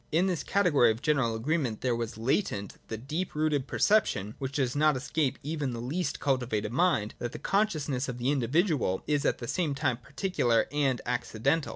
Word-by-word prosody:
In 165 Hz, +4 st, +3 dB
this 180 Hz, -4 st, 0 dB
category 175 Hz, -, +3 dB
of 110 Hz, +2 st, -2 dB
general 135 Hz, -7 st, +2 dB
agreement 130 Hz, -1 st, -1 dB
there 125 Hz, -1 st, +1 dB
was 115 Hz, -1 st, -4 dB
latent 115 Hz, -, -1 dB
the 110 Hz, -, -4 dB
deep 155 Hz, +11 st, -4 dB
rooted 150 Hz, -3 st, +1 dB
perception, 190 Hz, -, +2 dB
which 135 Hz, -1 st, -4 dB
does 130 Hz, -3 st, 0 dB
not 150 Hz, -1 st, +3 dB
escape 140 Hz, 0 st, -1 dB
even 145 Hz, -3 st, -2 dB
the 115 Hz, -, -5 dB
least 150 Hz, +10 st, -2 dB
cultivated 120 Hz, -6 st, 0 dB
mind, 145 Hz, -, +2 dB
that 120 Hz, -1 st, -4 dB
the -, -, -5 dB
consciousness 155 Hz, -11 st, 0 dB
of 125 Hz, -, -4 dB
the 125 Hz, +3 st, 0 dB
individual 140 Hz, -, +1 dB
is 145 Hz, -1 st, 0 dB
at -, -, +2 dB
the 120 Hz, -, -7 dB
same 155 Hz, 0 st, -1 dB
time 130 Hz, -4 st, 0 dB
particular 130 Hz, -, 0 dB
and 140 Hz, -4 st, +1 dB
accidental. 125 Hz, +5 st, 0 dB
135 Hz, 185 wpm, -29 LUFS, 120-155 Hz, -, In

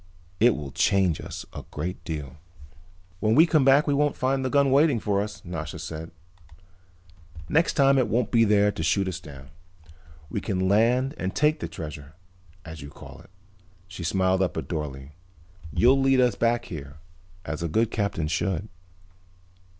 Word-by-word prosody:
It 120 Hz, 0 st, +5 dB
will 70 Hz, -3 st, -6 dB
change 95 Hz, -2 st, +2 dB
us -, -, -7 dB
a -, -, -7 dB
great 85 Hz, +5 st, -5 dB
deal." 75 Hz, -3 st, -6 dB, 0.8 s
"When 110 Hz, +1 st, +2 dB
we 160 Hz, -, +7 dB
come 155 Hz, -4 st, +3 dB
back 135 Hz, +2 st, +5 dB
we 145 Hz, -, +1 dB
won't 145 Hz, +1 st, +1 dB
find 135 Hz, +1 st, 0 dB
the 130 Hz, -, -1 dB
gun 140 Hz, 0 st, +3 dB
waiting 140 Hz, -2 st, +4 dB
for 100 Hz, -1 st, 0 dB
us," 105 Hz, -1 st, -7 dB
Nasha 80 Hz, -3 st, -5 dB
said. 80 Hz, 0 st, -7 dB, 1.4 s
"Next 165 Hz, +2 st, +2 dB
time 135 Hz, -1 st, +4 dB
it 125 Hz, -, +2 dB
won't 115 Hz, +1 st, 0 dB
be 115 Hz, -2 st, +4 dB
there 105 Hz, -1 st, +3 dB
to 80 Hz, -, -6 dB
shoot 95 Hz, +4 st, +1 dB
us 95 Hz, -1 st, -4 dB
down. 70 Hz, -5 st, -12 dB, 0.8 s
We 70 Hz, -, -4 dB
can 95 Hz, -1 st, -1 dB
land 120 Hz, +7 st, +2 dB
and 95 Hz, +1 st, -3 dB
take 150 Hz, +1 st, +2 dB
the -, -, -4 dB
treasure, 75 Hz, -1 st, -9 dB, 0.5 s
as 80 Hz, -1 st, -9 dB
you 70 Hz, -, -9 dB
call -, -, -13 dB
it." -, -, -17 dB, 0.6 s
She 90 Hz, -1 st, -8 dB
smiled 95 Hz, +2 st, +1 dB
up 90 Hz, -, -1 dB
at -, -, -4 dB
Dorle. 70 Hz, -4 st, -5 dB, 0.6 s
"You'll 130 Hz, -, +4 dB
lead 135 Hz, -1 st, +3 dB
us 125 Hz, -3 st, +4 dB
back 115 Hz, +3 st, 0 dB
there, 70 Hz, -3 st, -8 dB, 0.5 s
as 75 Hz, +1 st, -4 dB
a 85 Hz, -, -1 dB
good 110 Hz, +8 st, +1 dB
captain 100 Hz, -7 st, -1 dB
should." 95 Hz, +5 st, -2 dB
100 Hz, 175 wpm, -25 LUFS, 80-130 Hz, 1.4 s, we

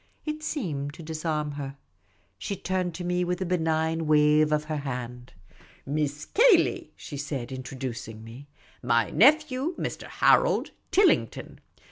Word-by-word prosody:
It 305 Hz, 0 st, -4 dB
seemed 150 Hz, -, -3 dB
to 165 Hz, -, -10 dB
disarm 155 Hz, -1 st, -2 dB
her. 140 Hz, -1 st, -6 dB, 0.6 s
She 200 Hz, -, -3 dB
turned 185 Hz, -2 st, -2 dB
to 180 Hz, -, -5 dB
me 180 Hz, 0 st, 0 dB
with 180 Hz, 0 st, -2 dB
a 190 Hz, -, -2 dB
benignant 160 Hz, -2 st, 0 dB
wave 150 Hz, 0 st, +4 dB
of 150 Hz, 0 st, +1 dB
her 155 Hz, 0 st, -3 dB
hand. 125 Hz, -3 st, -6 dB, 0.3 s
" -, -, -26 dB
Miss 145 Hz, +1 st, -2 dB
Cayley," 455 Hz, -5 st, +3 dB
she 145 Hz, -, -8 dB
said, 135 Hz, -3 st, -4 dB
introducing 130 Hz, -4 st, -6 dB
me; 120 Hz, +6 st, -11 dB, 0.2 s
" -, -, -29 dB
my 115 Hz, -, +2 dB
nephew, 295 Hz, -, +3 dB
Mr. -, -, -4 dB
Harold -, -, +3 dB, 0.2 s
Tilling 395 Hz, 0 st, +4 dB
ton. -, -, -11 dB
155 Hz, 150 wpm, -27 LUFS, 140-180 Hz, 0.6 s, wave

